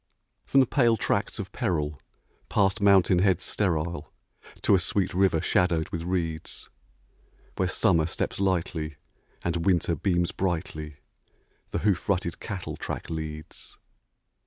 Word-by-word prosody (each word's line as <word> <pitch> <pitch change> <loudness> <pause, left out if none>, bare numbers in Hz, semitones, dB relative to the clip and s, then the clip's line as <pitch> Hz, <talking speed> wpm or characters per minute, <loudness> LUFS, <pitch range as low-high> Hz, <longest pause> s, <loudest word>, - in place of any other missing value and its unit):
From 135 - +5
the - - +4
pale 120 -3 +3
tracts - - 0
of - - -5
peril, 75 -4 -1 0.5
past 100 +1 +2
mountain 95 -3 +5
heads 95 -2 +3
sterile, 85 -5 -1 0.5
To - - +4
a 95 - +6
sweet 90 +2 0
river 95 -3 +3
shadowed 85 -3 +2
with 85 - -3
reeds, 85 -2 -3 0.9
Where 95 - +2
Summer 90 -4 +3
steps - - -2
lightly, 85 -5 -1 0.5
and 85 -1 -1
Winter 85 -2 +2
beams 85 +1 +1
brightly, 80 -5 -3 0.7
The - - -2
hoof 95 -5 +1
rutted 90 -3 0
cattle 100 -5 -5
track - - -5
leads. 80 -1 -6
90 Hz, 130 wpm, -27 LUFS, 80-95 Hz, 0.9 s, a